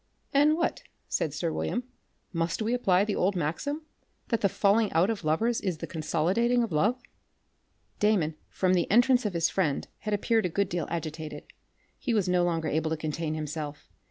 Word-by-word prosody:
"And 295 +3 +5
what," 335 +7 -1 0.3
said 155 - -1
sir 160 +2 -2
William, 245 - -1 0.5
"must 165 0 -1
we 225 +2 0
apply 195 -6 +3
the 210 - -1
old 190 +2 +1
maxim, 235 - -2 0.5
that 230 -3 +1
the 200 - +3
falling 205 +3 +3
out 175 +7 +3
of 210 -5 -4
lovers 220 +10 +1
is 185 -5 -1
the - - -5
consolidating 185 +10 +1
of 225 - -3
love?" 210 +11 +2 1.0
Damon 200 -7 +2 0.2
from 185 -1 +1
the 175 -2 +1
entrance 245 +1 +4
of 200 - -4
his 170 0 +2
friend 155 -8 0
had 210 -1 -1
appeared 220 0 +1
a - - -5
good 200 +3 0
deal 170 -3 -2
agitated. 155 -1 -5 0.6
He 245 -4 0
was 200 -4 +2
no 180 -1 +3
longer 165 -2 0
able 160 +1 0
to 160 - -1
contain 155 +1 -3
himself. 150 -1 -5
180 Hz, 185 wpm, -28 LUFS, 160-225 Hz, 1.0 s, And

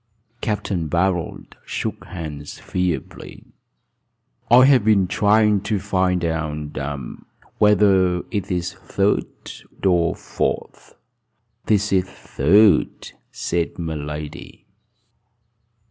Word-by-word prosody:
Capt. 105 -1 -2 0.2
Barold 85 0 -1
shook - - -4
hands 75 -5 -7
feebly. 90 -2 -4 1.1
"I 125 +2 +8
have 135 -5 +5
been 105 -3 +4
trying 105 +1 +3
to 105 +1 -1
find 95 -3 0
out 75 -2 -3 0.8
whether 95 -4 +4
it 100 -3 -3
is 90 -1 -2
third 100 +1 0 0.6
or 85 -3 +2
fourth," - - -4 0.7
he 105 - +5
said. 100 -1 +1
"It 95 0 -1
is - - -17
third," 100 +8 +2 0.2
said 85 -1 -2
my 80 -2 -3
lady. 75 0 -7
95 Hz, 100 wpm, -21 LUFS, 85-105 Hz, 1.1 s, I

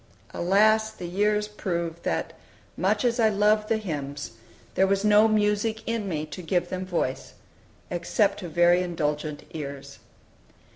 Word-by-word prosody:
Alas! 215 +4 +3
the 180 - -9
years 210 +4 +1
proved 170 -5 -4
that, - - -2 0.4
much - - +1
as 240 0 +1
I 220 -1 +5
loved 210 +1 +2
the 225 - +2
hymns, 145 -8 -5 0.4
there 190 - +3
was 195 +1 +1
no 210 +1 +6
music 215 +1 0
in 230 -3 -2
me 155 -3 -2
to 170 +4 -8
give 175 +1 -1
them 185 0 -4
voice, 165 -7 -2 0.6
except 180 +4 +1
to 180 -4 -6
very 175 +2 +4
indulgent 150 -4 -2
ears. 140 -2 -7
185 Hz, 145 wpm, -26 LUFS, 165-210 Hz, 0.6 s, no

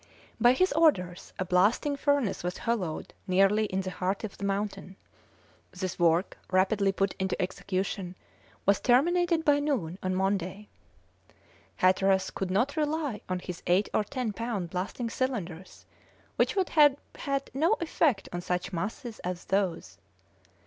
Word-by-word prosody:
By 245 +1 +6
his 370 +8 +2
orders 190 - +2
a 185 - -1
blasting 205 - +2
furnace 280 - 0
was 180 +1 -3
hollowed 200 -9 -2
nearly 195 +3 +4
in 190 -2 -2
the 185 0 -4
heart 190 +3 -2
of 215 - -5
the - - -9
mountain. 200 -1 -3 0.7
This 185 -1 -5
work, 170 +2 +2
rapidly 195 +1 +3
put 195 0 0
into 190 0 -1
execution, 185 0 -3 0.5
was 200 0 +4
terminated 335 +6 +3
by 290 -1 +4
noon 205 - -2
on 185 0 -1
Monday. 195 +1 -1 1.1
Hatteras 190 +1 +3
could 190 - -3
not 240 +11 +1
rely 300 -7 -1
on 185 - 0
his 180 -1 -7
eight 185 +4 +3
or - - +2
ten 235 0 -3
pound 205 -7 -3
blasting 190 +6 -3
cylinders, 190 -10 -4 0.5
which - - +1
would 380 -3 +1
have 295 -3 +6 0.2
had 275 -1 -3
no 320 - +3
effect 305 -10 +1
on 175 - -3
such 180 +2 -2
masses 215 +6 -4
as 180 0 -5
those. 180 - -1
195 Hz, 145 wpm, -28 LUFS, 185-260 Hz, 1.1 s, By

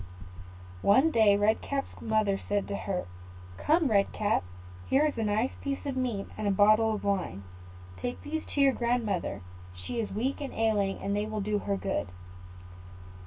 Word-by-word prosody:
One 265 +10 +5
day 215 -6 +5
Red 210 +2 +2
Cap's 275 -1 -4
mother 215 -3 +1
said 205 -1 0
to 200 - -2
her, 190 -2 -3 0.5
"Come, 315 0 +2
Red 200 -2 +3
Cap, 210 - 0 0.4
here 280 +3 +3
is 300 - 0
a 225 - -1
nice 215 +4 +1
piece 280 0 -3
of 275 -2 -2
meat, 240 -6 -1
and 210 - -3
a - - +3
bottle 215 +3 +4
of - - -6
wine: 185 - -1 0.5
take 245 0 -4
these 315 +2 -3
to 285 - +3
your 275 -1 +5
grandmother; 235 - -1 0.3
she 90 - -5
is 220 - -2
weak 255 +8 -2
and 280 - -5
ailing, 210 -3 +1
and 200 +1 -2
they 205 +1 -1
will 215 0 -3
do 210 +1 0
her 200 0 -2
good. 195 - -2
215 Hz, 175 wpm, -29 LUFS, 200-255 Hz, 0.5 s, One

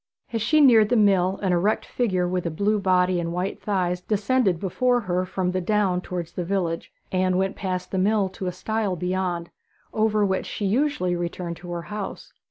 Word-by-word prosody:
As 225 - -1
she 305 +8 +3
neared 225 -6 +6
the 245 - +3
mill 195 -3 +3
an 185 -2 +2
erect 190 +5 +1
figure 185 -7 0
with 180 -1 -1
a - - 0
blue 205 +6 0
body 185 -1 +2
and 170 -1 -2
white 180 +3 -3
thighs 180 -3 -1
descended 210 -2 +1
before 245 +6 +1
her 185 -2 -1
from 185 -1 -1
the 185 0 -1
down 190 -2 +1
towards 175 -2 -5
the 180 - -4
village, 170 -2 -2 0.2
and 185 -1 +1
went 190 +1 0
past 185 -2 -3
the 190 - 0
mill 205 +1 +2
to 185 0 -6
a - - 0
stile 215 0 -2
beyond, 180 -1 -2 0.4
over 215 -1 +2
which 190 -1 -1
she 205 - -4
usually 210 -5 +1
returned 175 0 -4
to 175 - -11
her 170 -1 -4
house. 210 - -6
185 Hz, 195 wpm, -24 LUFS, 180-210 Hz, 0.4 s, neared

